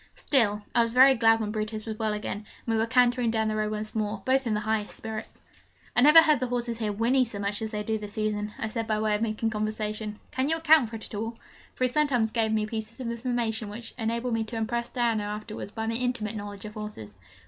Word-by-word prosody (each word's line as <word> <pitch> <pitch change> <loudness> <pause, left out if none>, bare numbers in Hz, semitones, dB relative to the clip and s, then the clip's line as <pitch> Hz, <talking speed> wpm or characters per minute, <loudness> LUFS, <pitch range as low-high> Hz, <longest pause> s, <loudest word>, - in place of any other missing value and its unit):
Still, 210 -7 +1
I 240 - +4
was 230 0 0
very 260 +2 +8
glad 225 -2 +4
when 210 -1 -2
Brutus 215 0 -3
was 220 -1 -5
well 220 -1 0
again, 210 -1 -3
and 210 - -11 0.2
we 230 - 0
were 225 +1 +1
cantering 245 0 +3
down 220 -1 +1
the 215 - -1
Row 215 0 0
once 215 0 -3
more, 210 -2 -2
both 265 0 +2
in 215 - +1
the - - 0
highest 215 0 -2
spirits. 220 -1 -6 0.6
'I - - +5
never 305 +4 +9
heard 305 -4 +4
the 255 - -1
horses 240 -1 -2
here 215 -2 0
whinny 235 +5 +3
so 230 -4 -5
much 200 +1 -2
as 220 - -2
they 210 -1 -3
do 220 +1 -1
this 210 -1 -7
season,' 210 -1 -1
I 220 - -2
said, 225 0 -3
by 215 -1 +1
way 215 0 +1
of 210 - 0
making 225 0 0
conversation. 215 0 -3
'Can 260 +2 0
you 325 - +2
account 315 -6 +5
for 225 - -7
it 220 - -7
at - - -9
all?' 225 +2 -4 0.4
For - - -2
he - - +5
sometimes 250 -5 +1
gave 220 -2 +1
me 215 -1 +1
pieces 220 +2 -6
of 240 -2 -3
information 235 -3 -2
which 225 +2 -6
enabled 235 +1 -1
me 225 -1 +1
to 230 - -7
impress 235 +2 -2
Diana 235 -3 +1
afterwards 210 +1 -5
by 225 +1 -4
my 225 - -1
intimate 230 -3 -1
knowledge 205 -1 -7
of 210 - -7
horses. 210 - -7
220 Hz, 250 wpm, -27 LUFS, 215-240 Hz, 0.6 s, never